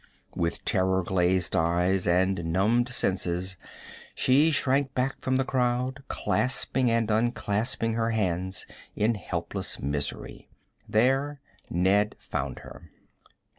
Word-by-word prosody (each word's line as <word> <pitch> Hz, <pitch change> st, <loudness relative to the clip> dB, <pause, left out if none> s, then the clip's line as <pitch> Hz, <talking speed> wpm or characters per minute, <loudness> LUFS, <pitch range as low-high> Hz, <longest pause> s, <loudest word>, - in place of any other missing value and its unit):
With 85 Hz, 0 st, -2 dB
terror 95 Hz, 0 st, +2 dB
glazed 90 Hz, 0 st, +1 dB
eyes 90 Hz, +3 st, +1 dB
and 90 Hz, +1 st, +2 dB
numbed 115 Hz, +7 st, +2 dB
senses 95 Hz, -4 st, -1 dB, 0.6 s
she 140 Hz, +5 st, +4 dB
shrank 135 Hz, -2 st, +1 dB
back 130 Hz, +1 st, -1 dB
from 130 Hz, 0 st, +1 dB
the 135 Hz, -, +1 dB
crowd, 130 Hz, +1 st, 0 dB
clasping 130 Hz, 0 st, +1 dB
and 115 Hz, -1 st, +1 dB
unclasping 115 Hz, 0 st, 0 dB
her 115 Hz, 0 st, 0 dB
hands 95 Hz, -4 st, -1 dB, 0.3 s
in 110 Hz, +3 st, +2 dB
helpless 105 Hz, -, -4 dB
misery. 70 Hz, +1 st, -4 dB, 0.4 s
There 135 Hz, +6 st, +2 dB, 0.3 s
Ned 100 Hz, +4 st, +2 dB
found 65 Hz, -2 st, -4 dB
her. -, -, -12 dB
105 Hz, 110 wpm, -27 LUFS, 90-125 Hz, 0.6 s, she